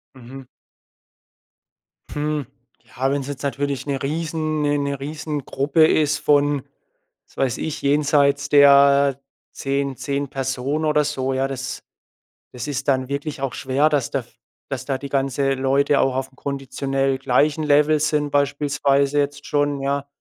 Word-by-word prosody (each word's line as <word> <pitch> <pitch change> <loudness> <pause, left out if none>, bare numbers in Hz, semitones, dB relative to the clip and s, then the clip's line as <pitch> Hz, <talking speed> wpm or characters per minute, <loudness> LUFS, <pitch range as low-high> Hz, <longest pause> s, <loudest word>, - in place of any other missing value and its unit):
Mhm. 130 +1 -11 1.7
Hm. 150 -2 -2 0.4
Ja, 135 +2 -2
wenn's 140 -1 -2
jetzt 145 -1 -6
natürlich 140 -1 -2
'ne 140 -2 -3
Riesen 155 +1 -2
'ne 145 0 +1
'ne 140 -1 -2
Riesengruppe 150 0 0
ist 150 -2 +2
von, 145 -2 +2 0.6
was - - -26
weiß 130 -2 0
ich, 155 - -4
jenseits 145 0 +2
der 140 -1 +6 0.3
10- 140 -1 -2
10 140 -1 -3
Personen 135 +3 -2
oder 150 -1 +3
so, 135 -3 -2
ja, 135 +1 0
das 130 -1 -5 0.7
das 125 +1 -6
ist 140 -1 -4
dann 130 -2 +1
wirklich 140 +1 -4
auch 135 -2 -2
schwer, 140 +3 +1
dass 145 -5 0
da 135 - -1
v - - -25 0.4
dass 130 -2 -4
da 135 -2 -1
die 140 +1 -8
ganze 135 0 0
Leute 135 +2 +2
auch 130 -1 +1
auf 130 0 -2
einem 130 - -26
konditionell 135 -1 -2
gleichen 145 +4 +1
Level 150 +1 +3
sind 150 -1 0
beispielsweise 140 0 +1
jetzt 145 0 -2
schon, 145 -1 0
ja? 140 +1 -2
140 Hz, 150 wpm, -21 LUFS, 135-145 Hz, 1.7 s, der